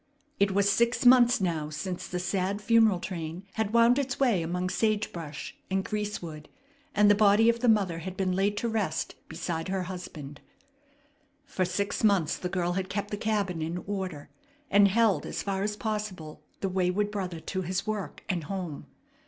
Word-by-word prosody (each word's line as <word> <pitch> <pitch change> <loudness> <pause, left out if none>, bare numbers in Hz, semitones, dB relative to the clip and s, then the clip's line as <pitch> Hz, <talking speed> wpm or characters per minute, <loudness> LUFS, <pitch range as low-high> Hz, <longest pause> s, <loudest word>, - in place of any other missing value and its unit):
It 200 - +4
was 200 +1 +2
six 235 +4 +2
months 245 -1 +7
now 165 -5 -1
since 175 +4 -5
the 180 - -3
sad 185 +2 -1
funeral 220 -3 +4
train 170 -1 -5
had 220 -2 -1
wound 235 +3 +5
its 270 -2 -2
way 240 -10 +3
among 180 +2 -2
sage 215 -1 0
brush 155 -4 -7
and 190 0 0
greasewood, 180 -8 -4 0.5
and 210 0 +5
the 205 - +7
body 210 +2 +5
of 235 0 +1
the 245 0 +2
mother 195 -6 +2
had 185 +3 -7
been 190 -1 0
laid 195 +3 +1
to 235 - -1
rest 210 -8 -1 0.2
beside 165 -2 -3
her 190 0 -1
husband. 160 -6 -8 1.0
For 185 -8 -1
six 200 +4 -2
months 200 -7 +3
the 180 - -4
girl 175 -1 0
had 190 0 -2
kept 205 0 -3
the - - -1
cabin 205 -5 -1
in 165 +2 -2
order, 190 -7 -5 0.4
and 200 0 +7
held 220 0 +3
as - - -4
far 195 -1 -2
as 210 +1 -2
possible 210 -9 -4 0.2
the 195 - 0
wayward 185 +3 0
brother 185 -5 -4
to 190 +3 -4
his 185 +1 -2
work 215 -2 -4
and 175 -7 -2
home. 180 -6 -5
195 Hz, 180 wpm, -28 LUFS, 180-210 Hz, 1.0 s, months